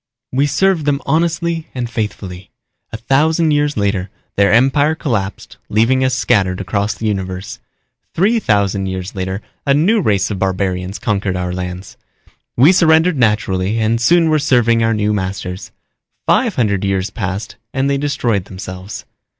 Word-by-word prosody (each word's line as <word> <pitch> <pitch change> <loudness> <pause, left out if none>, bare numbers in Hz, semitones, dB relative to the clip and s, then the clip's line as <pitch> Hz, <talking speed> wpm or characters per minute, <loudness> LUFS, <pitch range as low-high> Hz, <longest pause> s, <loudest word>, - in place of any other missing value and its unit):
We 140 +3 +2
served 170 +2 +1
them 145 -2 +1
honestly 165 +1 0
and 125 -2 -2
faithfully. 100 -5 -5 0.4
A 115 - -5
thousand 155 +7 +2
years 145 -2 +1
later 100 -2 0 0.3
their 100 0 +3
empire 135 +6 +3
collapsed 105 -11 -3
leaving 120 +5 +2
us 130 -1 +1
scattered 95 -8 +1
across 100 +1 -1
the 110 - -6
universe. 95 -2 -3 0.6
Three 215 +7 +3
thousand 100 - +1
years 95 0 -5
later 95 +1 -4 0.2
a 140 -1 +2
new 200 +9 +3
race 100 - +1
of 100 - -3
barbarians 95 0 -1
conquered 100 -3 -1
our 90 0 -2
planets. 90 +1 -6 0.6
We 140 +8 +7
surrendered 165 -2 +4
naturally 105 -3 +1
and 115 +1 +1
soon 165 +5 +4
were 155 - +3
serving 120 -5 +3
our 115 0 +2
new 105 0 0
masters. 95 -1 -4 0.5
Five - - +2
hundred 100 -5 0
years 95 0 -1
passed 95 -2 -4
and 135 +1 0
they 140 0 0
destroyed 120 -9 -1
themselves. 95 0 -8
110 Hz, 150 wpm, -17 LUFS, 95-140 Hz, 0.6 s, We